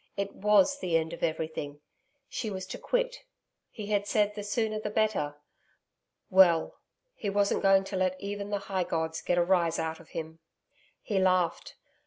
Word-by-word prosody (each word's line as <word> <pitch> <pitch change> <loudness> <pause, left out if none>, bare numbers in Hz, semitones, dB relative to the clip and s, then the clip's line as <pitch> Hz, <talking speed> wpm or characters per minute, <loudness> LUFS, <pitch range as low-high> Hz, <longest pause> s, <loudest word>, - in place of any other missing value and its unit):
It 200 0 -2
WAS 210 +7 +3
the 170 -7 +1
end 160 +1 -2
of 170 - -8
everything. 155 -3 -3 0.5
She 225 - -4
was 190 -2 -5
to - - -7
quit.... - - -1 0.5
He 215 -2 -7
had 205 -1 +1
said, 210 -1 +2
the 205 - -5
sooner 215 +1 -1
the 215 - -3
better.... 210 -9 0 1.0
Well 175 -4 +5 0.3
he 210 - -4
wasn't 200 0 +1
going 195 0 +5
to 195 +1 -6
let 185 0 0
even 200 +1 -5
the 205 - 0
high 190 -2 0
gods 160 -1 -2
get 175 - 0
a 175 - +4
rise 175 -3 +2
out 160 0 -3
of 165 - -16
him. 160 0 -6 0.6
He 200 -3 0
laughed. 185 -2 +1
190 Hz, 175 wpm, -29 LUFS, 165-205 Hz, 1.0 s, Well